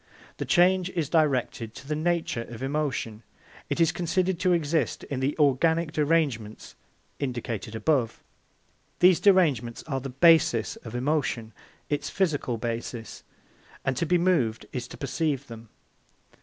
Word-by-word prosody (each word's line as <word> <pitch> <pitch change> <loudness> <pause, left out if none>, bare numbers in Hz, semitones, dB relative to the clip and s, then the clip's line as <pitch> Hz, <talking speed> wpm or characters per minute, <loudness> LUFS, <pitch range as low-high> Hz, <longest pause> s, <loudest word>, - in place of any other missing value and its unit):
The - - -3
change 185 -1 +3
is 165 -6 -2
directed 130 -8 0
to 135 +1 -11
the 150 - -1
nature 165 -6 -1
of 120 +1 -8
emotion. 135 -6 -2 0.5
It - - -2
is 165 -2 +4
considered 180 +1 -1
to 185 -1 +2
exist 165 -2 0
in 135 - -4
the 135 +2 -1
organic 160 +3 +2
derangements 145 -9 -1 0.5
indicated 120 -5 -4
above. 120 -1 0 0.7
These 180 -1 +5
derangements 150 - +3
are 135 -4 -3
the 135 +1 -6
basis 135 -5 +4
of 115 0 -10
emotion, 125 -4 -1 0.3
its 145 -1 -2
physical 150 -10 0
basis, 115 0 -5 0.6
and 135 - 0
to 165 - -1
be 180 - +3
moved 160 -11 +1
is 125 -1 -4
to - - -11
perceive 140 0 -2
them. 115 -2 -11
145 Hz, 140 wpm, -26 LUFS, 120-165 Hz, 0.7 s, These